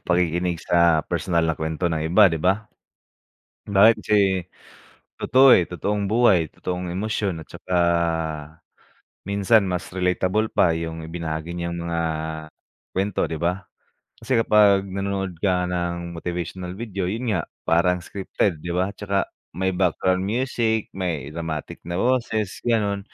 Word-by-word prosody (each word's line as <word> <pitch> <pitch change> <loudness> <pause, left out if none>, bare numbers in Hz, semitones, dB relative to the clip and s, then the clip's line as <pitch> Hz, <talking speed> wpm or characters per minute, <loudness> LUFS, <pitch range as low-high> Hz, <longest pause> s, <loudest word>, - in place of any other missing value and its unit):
pakikinig 90 0 +1
sa 85 -3 +3
personal 85 -3 0
na 80 - +1
kuwento 80 +2 -2
ng 80 - -1
iba, 95 +6 +6
'di 80 -2 -2
ba? 95 +4 +1 1.1
Bakit 105 +3 +6
si 105 - +3 1.0
totoo, 130 0 +6
eh, 90 - +3
totoong 100 +4 -2
buhay, 105 -8 +4
totoong 90 -1 -4
emosyon 100 -2 -2
at - - -29
tsaka 90 - -5 1.5
minsan 100 0 +3
mas 90 -1 -2
relatable 95 +4 +1
pa, 85 - +3
yung 80 0 -4
ibinahagi 80 0 -4
niyang 85 0 -4
mga 85 0 -2 1.0
kuwento, 95 +1 0
'di 80 - -3
ba? 90 +4 -2 0.5
Kasi 130 - -2
kapag 105 -3 +5
nanonood 95 -2 -3
ka 90 -2 +1
ng 85 -1 -3
motivational 90 +1 -5
video, 100 -5 -3
'yon 115 +3 -2
nga, 90 - 0 0.2
parang 90 +1 +2
scripted, 95 -3 -2
'di 85 - -6
ba? 95 +2 0
Tsaka 100 -1 -1 0.3
may 95 0 0
background 90 0 +1
music, 110 0 -1
may 80 -7 -3
dramatic 80 -2 -5
na 85 - -2
boses, 110 -3 0
gano'n. 105 -4 +1
90 Hz, 135 wpm, -23 LUFS, 85-100 Hz, 1.5 s, iba